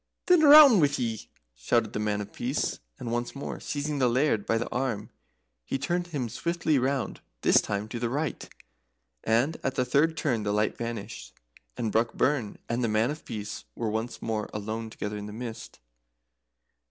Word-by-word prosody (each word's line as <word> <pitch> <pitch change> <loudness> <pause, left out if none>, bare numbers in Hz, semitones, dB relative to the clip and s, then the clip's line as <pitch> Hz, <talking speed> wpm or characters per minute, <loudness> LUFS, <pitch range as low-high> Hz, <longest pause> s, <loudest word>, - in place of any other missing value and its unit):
"Then 360 -3 +5
roun' 290 -7 +9
wi' 145 -3 +5
ye!" 115 -3 -3 0.2
shouted - - 0
the - - -2
Man 105 -1 0
of 105 +1 -8
Peace; 130 +5 -2 0.2
and 115 - -5
once 120 +2 -2
more 140 - -5
seizing 145 0 -3
the 125 -2 +3
Laird 120 -4 +1
by 115 - +2
the 115 - -2
arm, 120 -5 -2 0.5
he 100 - -2
turned 175 +6 -1
him 145 -8 -3
swiftly 160 +4 0
round 135 +1 -1 0.2
this - - +5
time, 105 +1 -3
to 120 - -4
the 120 0 -1
right 145 +4 -3 0.7
and 120 +8 +2
at 135 -1 -2
the 125 - +1
third 155 +6 +2
turn 125 -9 0
the 105 -1 -1
light 105 +1 +1
vanished, 115 -3 -6 0.4
and 110 -2 -1
Brockburn 115 +2 +1
and 120 +1 -1
the - - +2
Man 110 +4 +2
of 155 - -7
Peace 105 -1 -6
were 115 -2 -2
once 115 +2 -4
more 110 -2 -2
alone 110 +2 -4
together 105 -1 -5
in 105 0 -6
the 105 - -8
mist. 115 0 -7
120 Hz, 180 wpm, -28 LUFS, 110-140 Hz, 0.7 s, roun